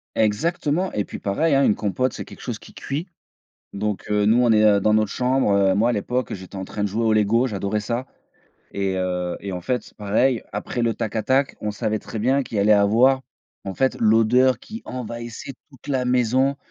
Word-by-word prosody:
Exactement 150 - 0
et 105 - 0
puis - - -8
pareil, 145 +11 0
hein. 140 0 +4
Une 105 - +3
compote 125 +5 -1
c'est - - -6
quelque - - -13
chose 120 -4 -5
qui - - -15
cuit. 150 +7 -4 0.7
Donc 105 0 -3
heu, 105 0 +2
nous 110 +3 +4
on 120 - +3
est 105 -2 +5
dans 105 +2 +2
notre 110 -1 +2
chambre, 125 -3 +1
heu, 100 -1 +3
moi 110 +5 +2
à - - +1
l'époque 125 +3 -2
j'étais 95 +1 -10
en 95 - -4
train 105 - -5
de 105 - +1
jouer 110 +4 -1
au 110 - +3
LEGO, 110 +4 +3
j'adorais 105 -2 -2
ça 120 +4 -3 0.7
et 95 -1 -1
heu 90 -1 -2
et 100 -1 -6
en 90 - -4
fait, 125 +7 -3
pareil, 110 +5 +1
après 120 - -3
le 115 -1 +1
tac-attaque, 115 +5 0
on 105 - -2
savait 105 +1 -2
très 110 - -7
bien 135 +5 +2
qu'il 110 -4 -3
allait 105 +2 +5
avoir 115 +6 +4 0.4
en 95 - -5
fait 130 +6 +1
l'odeur 115 +4 +4
qui 225 +2 -9
envahissait 120 +1 -6 0.2
toute 135 -5 -17
la 135 -3 0
maison 125 +3 +2
110 Hz, 205 wpm, -22 LUFS, 105-130 Hz, 0.7 s, est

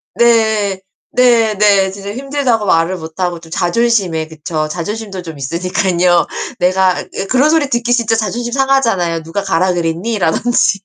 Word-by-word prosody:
네. 220 -4 +2 0.3
네. 230 -4 +3
네. 200 -2 +3
진짜 200 +1 -7
힘들다고 265 -4 -1
말을 165 +1 +2
못 160 +2 -10
하고 175 -2 -1
좀 165 -1 -15
자존심에 180 -4 0
그쵸. 155 0 -4
자존심도 195 +3 -5
좀 160 -3 -8
있으니깐요. 175 +4 +1 0.3
내가 185 0 +2
예 195 - -3
그런 265 +6 +3
소리 310 -4 +2
듣기 240 0 -1
진짜 230 -2 +1
자존심 235 +3 -2
상하잖아요, 230 -12 +1
"누가 180 +5 -4
가라 185 -1 +1
그랬니?" 175 +6 -2
라든지. 195 +4 +1
195 Hz, 330 characters per minute, -15 LUFS, 175-235 Hz, 0.3 s, 네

